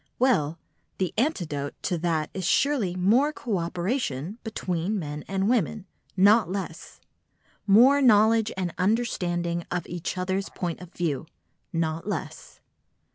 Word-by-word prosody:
Well, 170 - +2 0.4
the 185 -3 -1
antidote 170 - -1
to 180 - 0
that 160 -2 -1
is 190 - -4
surely 235 - +2
more 225 +11 +3
co 225 -10 -2
operation 175 - -2
between 195 -3 -2
men 150 -4 -5
and 195 0 0
women, 225 -3 0 0.3
not 205 0 +5
less; 195 +1 -6 0.7
more 250 +8 +6
knowledge 220 -2 +5
and 180 -3 -2
understanding 175 -5 0
of 175 -2 -2
each 175 +1 -5
other's 190 +2 -1
point 175 -1 -4
of 180 -1 -11
view, 160 -3 -2 0.4
not 165 +1 -2
less. 190 -8 -6
185 Hz, 130 wpm, -26 LUFS, 170-220 Hz, 0.7 s, more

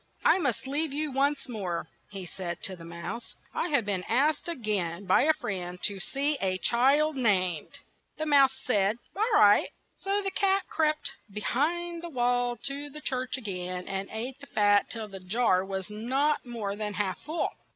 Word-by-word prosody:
"I - - +6
must 270 - -1
leave 290 +3 0
you 300 +1 -1
once 280 +2 +1
more," 185 -8 -3 0.2
he 195 -2 -6
said 175 -1 -6
to 190 - -2
the 170 - -12
mouse. 170 +8 -7 0.2
"I - - 0
have 285 -9 +2
been 195 -3 -1
asked 290 +8 +2
a 340 - -2
gain 200 -6 -2
by 185 - +5
a 315 - +5
friend 180 - -4
to 200 -2 0
see 280 +8 -1
a 185 -1 +1
child 275 +9 +3
named." 185 - +1 0.4
The 310 - -2
mouse 275 -3 +5
said 210 -2 +2 0.2
"All 435 +4 +1
right," 205 - +6 0.3
so 395 +1 0
the 390 - -1
cat 390 0 +2
crept 305 -3 +1 0.2
be 210 +1 -5
hind 340 +8 0
the 345 - -6
wall 245 -3 +1
to 280 +1 -3
the 300 +2 -9
church 255 -2 -2
a - - -8
gain, 180 -3 -4
and 195 0 -3
ate 245 +5 -5
the 280 - -11
fat 205 -3 +3
till 225 -2 -5
the 195 -2 -9
jar 185 0 +2
was 190 -1 -4
not 260 +7 0
more 215 -4 -3
than 210 -1 -4
half 190 -3 -1
full. 315 +3 -2
240 Hz, 190 wpm, -29 LUFS, 195-290 Hz, 0.4 s, I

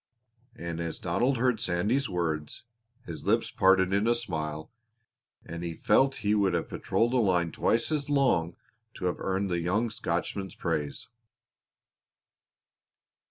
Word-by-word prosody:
And 85 -1 -5
as 85 -1 -3
Donald 120 +10 0
heard 125 -2 +1
Sandy's 105 +9 0
words 80 -4 -3 0.4
his 85 -5 -7
lips - - +1
parted 95 0 +4
in 100 +3 +2
a 120 - +4
smile 80 -9 -4 0.7
and 85 +1 -6
he 85 -1 -4
felt 135 +9 +3
he 105 - +3
would 100 -4 +2
have 85 - -2
patrolled 120 +2 0
a - - +3
line 90 -7 +2
twice 115 - +1
as 150 -2 -1
long 120 - +2 0.4
to - - -5
have 90 - -1
earned 95 0 -1
the 85 - +1
young 105 +7 0
Scotchman's 100 -2 -3
praise. 80 +2 -3
95 Hz, 140 wpm, -28 LUFS, 85-115 Hz, 0.7 s, parted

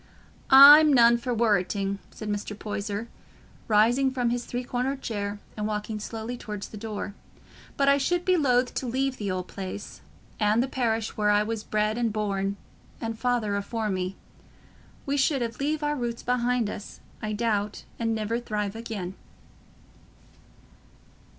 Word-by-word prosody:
"I'm 290 +3 +10
none 235 -2 +6
for 250 +1 -3
worreting," 200 -3 +1
said 215 - -8
Mr. 205 0 -3
Poyser, 210 +1 -4 0.6
rising 235 +5 +4
from 250 -2 0
his 245 0 -2
three 245 +1 -4
cornered 255 +2 -2
chair 205 -2 -3 0.2
and 210 -1 -2
walking 210 0 -3
slowly 225 +3 -5
towards 210 -4 -6
the - - -10
door; 210 -1 -5 0.6
"but 275 - +2
I 280 0 +5
should 350 +5 0
be 370 - +4
loath 250 -6 +2
to 260 - -3
leave 265 +2 -1
th' 205 -2 -3
old 185 -1 -3
place, 195 +1 -7 0.4
and 215 +2 +3
the - - -2
parish 230 -4 -1
where 210 -1 +1
I 205 0 +4
was 220 0 -4
bred 215 +2 0
and 230 -2 +1
born, 200 -2 -1 0.4
and 225 -1 -3
Father 240 -5 0
afore 215 +1 -2
me. 185 0 -2 0.9
We 285 0 0
should 265 -4 0
leave 300 +2 -1
our 295 0 0
roots 240 -3 -4
behind 245 -1 +1
us, 205 - -7 0.2
I 215 0 -3
doubt, 210 -2 -1 0.2
and 225 -1 0
niver 220 +2 -1
thrive 210 -3 -3
again." 220 -5 -5
225 Hz, 155 wpm, -26 LUFS, 210-245 Hz, 0.9 s, I'm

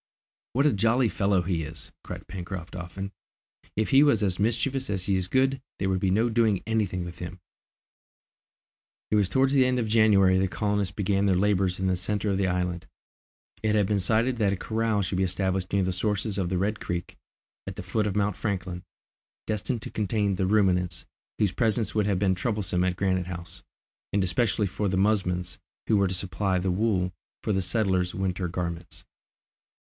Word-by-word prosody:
"What 135 +4 +2
a 150 - +4
jolly 115 +4 +3
fellow 95 -1 +1
he 85 -2 -1
is!" 80 +1 -8
cried - - -7
Pencroft 90 -1 -6
often. 90 +3 -6 0.6
"If 110 0 0
he 135 0 +6
was 140 -8 +4
as 95 -3 0
mischievous 125 +5 0
as 95 -3 -1
he 95 0 +1
is 95 -1 0
good, 130 +3 +2 0.2
there 95 - -1
would 95 -1 +1
be 95 - +1
no 110 +5 +3
doing 110 -4 +2
any 110 -1 +1
thing 90 -1 -4
with 85 0 -9
him!" 90 +1 -7 1.7
It - - +3
was 100 -3 +3
towards 135 +5 +2
the 135 -2 +5
end 125 0 +1
of 115 -3 0
January 100 -4 +5
the 95 - +2
colonists 100 -1 -1
began 100 0 +1
their 95 - +3
labours 95 -1 +1
in 95 - -1
the 95 -1 +2
centre 100 +3 -1
of 95 - 0
the 95 - +2
island. 90 -1 -2 0.7
It 110 -1 +1
had 105 -2 +3
been 105 +1 +1
decided 115 +6 +1
that 105 -3 +2
a - - 0
corral 110 0 0
should 90 0 -2
be - - +3
established 95 0 -1
near 100 -1 +2
the 95 - 0
sources 100 +2 -1
of 90 -2 -1
the 95 - 0
Red 100 +3 0
Creek, 85 0 -4 0.5
at - - -5
the - - -6
foot 105 +4 0
of 100 - -2
Mount 100 -2 +1
Franklin, 90 -3 -3 0.6
destined 110 +2 -2
to - - -6
contain 105 -1 0
the 95 0 0
ruminants, 90 -4 +1 0.3
whose 105 -4 +2
presence 110 +1 0
would 105 -2 +1
have 100 -3 +1
been 95 0 +2
troublesome 95 -2 -1
at 90 -1 0
Granite 95 -2 0
House, 85 -2 -7 0.5
and 100 -1 +2
especially 105 +3 +1
for 100 +2 -2
the 95 - 0
musmons, 90 -3 0 0.3
who 110 - +2
were 100 -1 +3
to 95 - -1
supply 95 +1 0
the 90 +1 0
wool 95 -2 +1 0.3
for 105 - 0
the 95 - +1
settlers' 95 -2 0
winter 95 -1 -1
garments. 85 -1 -5
95 Hz, 195 wpm, -27 LUFS, 90-110 Hz, 1.7 s, he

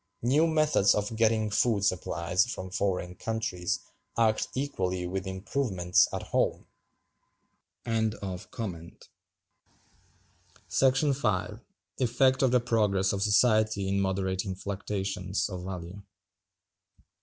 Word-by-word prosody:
New 145 +7 +4
methods 155 -11 +3
of 105 +2 -2
getting 110 -1 +2
food 105 -2 +2
supplies 90 +3 +1
from 95 -6 -6
foreign 90 -2 -1
countries 110 -3 -2 0.4
act 110 -2 +2
equally 95 -10 -2
with 95 +2 -3
improvements 95 -2 +1
at - - -4
home. - - 0 1.2
§ 100 -5 -4 2.1
5. 105 -4 -1 0.4
Effect 130 +1 +3
of 135 - +4
the 125 +1 +4
Progress 105 -5 +1
of 100 - -2
Society 110 -1 +3
in 100 0 +1
moderating 95 0 -1
fluctuations 95 -1 -3
of 90 -2 -6
Value. 90 +1 -7
100 Hz, 100 wpm, -28 LUFS, 95-115 Hz, 2.1 s, New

